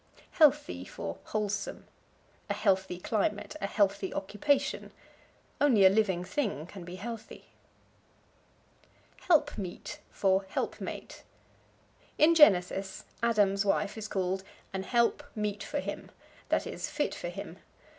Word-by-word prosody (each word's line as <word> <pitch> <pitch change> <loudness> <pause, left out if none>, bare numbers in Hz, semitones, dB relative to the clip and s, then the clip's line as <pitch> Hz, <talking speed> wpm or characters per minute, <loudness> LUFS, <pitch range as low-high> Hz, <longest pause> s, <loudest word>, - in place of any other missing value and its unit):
Healthy 295 -2 +3
for - - -6
Wholesome. 210 -1 -3 0.6
"A 205 - 0
healthy 190 -3 +1
climate." 210 +1 -1
"A 200 - 0
healthy 200 -2 +1
occupation." 275 +8 0 0.7
Only 230 -9 +6
a 190 - +8
living 195 -4 +2
thing 200 - -2
can 185 +1 -10
be 175 +1 -8
healthy. 225 +3 -8 1.8
Helpmeet 290 - +1
for 195 0 +2
Helpmate. 190 - -4 1.0
In 315 +2 +6
Genesis 190 - +4 0.2
Adam's 205 -4 +3
wife 200 0 +1
is 220 -1 -5
called 190 -1 -1 0.3
"an 190 - -2
help 235 +7 +2
meet 210 -1 -2
for - - -3
him," - - -5 0.4
that - - +2
is, - - -4
fit - - -1
for - - -5
him. - - -8
205 Hz, 115 wpm, -30 LUFS, 190-235 Hz, 1.8 s, a